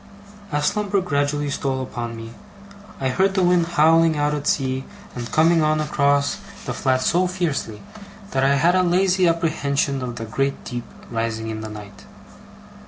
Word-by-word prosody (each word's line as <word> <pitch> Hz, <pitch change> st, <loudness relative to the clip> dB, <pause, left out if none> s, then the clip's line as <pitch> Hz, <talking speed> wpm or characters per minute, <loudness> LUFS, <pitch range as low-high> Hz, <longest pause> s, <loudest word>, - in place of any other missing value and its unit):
As 145 Hz, 0 st, 0 dB
slumber 205 Hz, +1 st, +1 dB
gradually 145 Hz, -4 st, -1 dB
stole 135 Hz, -2 st, -2 dB
upon 120 Hz, -2 st, -5 dB
me, 115 Hz, 0 st, -9 dB, 0.7 s
I 130 Hz, -, 0 dB
heard 190 Hz, +8 st, +1 dB
the 190 Hz, -, +2 dB
wind 175 Hz, -1 st, +3 dB
howling 165 Hz, -1 st, +4 dB
out 145 Hz, 0 st, +1 dB
at 145 Hz, -1 st, -3 dB
sea 130 Hz, -1 st, 0 dB, 0.3 s
and 120 Hz, -1 st, -6 dB
coming 165 Hz, +1 st, +4 dB
on 155 Hz, 0 st, +2 dB
across 140 Hz, -1 st, +1 dB, 0.3 s
the -, -, -3 dB
flat 130 Hz, -1 st, +1 dB
so 180 Hz, +5 st, +2 dB
fiercely, 165 Hz, -, -3 dB, 0.5 s
that 135 Hz, -, +1 dB
I 140 Hz, +1 st, +4 dB
had 165 Hz, +5 st, +3 dB
a 185 Hz, -, +4 dB
lazy 185 Hz, +1 st, +3 dB
apprehension 145 Hz, -4 st, 0 dB
of 125 Hz, -2 st, -4 dB
the 115 Hz, -, -5 dB
great 135 Hz, +5 st, -2 dB
deep 120 Hz, -2 st, -5 dB, 0.3 s
rising 115 Hz, -1 st, -2 dB
in 110 Hz, 0 st, -5 dB
the 110 Hz, -, -6 dB
night. 105 Hz, -1 st, -11 dB
145 Hz, 170 wpm, -22 LUFS, 130-170 Hz, 0.7 s, howling